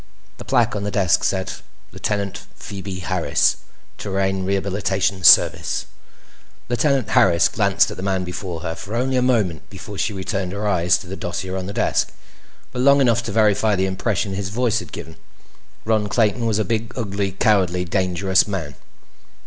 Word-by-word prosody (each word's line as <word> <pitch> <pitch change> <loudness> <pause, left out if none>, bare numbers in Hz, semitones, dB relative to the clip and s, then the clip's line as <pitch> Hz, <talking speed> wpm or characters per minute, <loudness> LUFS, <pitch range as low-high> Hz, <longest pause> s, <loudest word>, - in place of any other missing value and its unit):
The - - -9
plaque - - +2
on 100 - -3
the 105 - -2
desk 95 -3 +2
said: 95 -1 -1 0.4
LT. 100 -2 -2 0.2
PHOEBE 95 -2 -7
HARRIS 90 -2 +1 0.4
TERRAN 95 -1 -1
REHABILITATION 95 -1 -1
SERVICE - - +5 0.8
Lieutenant 130 -1 +1
Harris 85 0 +4
glanced - - +2
at - - -8
the - - -6
man 95 -1 -1
before 90 -2 -5
her 80 -1 -3
for 105 +6 -7
only 130 +2 0
a 125 - +2
moment 105 - 0
before 100 -2 -9
she 120 - 0
returned 95 -1 -3
her 105 +1 -3
eyes 90 -3 +3
to - - -11
the 95 - -6
dossier 95 +1 -4
on 95 -1 -4
the - - -4
desk; - - 0 0.6
but 125 -1 -3
long 140 +2 +5
enough 120 -3 +3
to 115 - -5
verify 105 0 +3
the 95 0 +1
impression 100 +1 -1
his 95 -1 -3
voice 120 +2 0
had - - -10
given. 80 - -9 0.7
Ron 110 -2 +1
Clayton 110 +2 +1
was 110 -2 +1
a 110 - 0
big, 115 +1 -2
ugly, 100 -4 -2
cowardly, 90 -3 +2
dangerous 95 +1 +1
man. 85 -8 -4
100 Hz, 170 wpm, -21 LUFS, 95-110 Hz, 0.8 s, SERVICE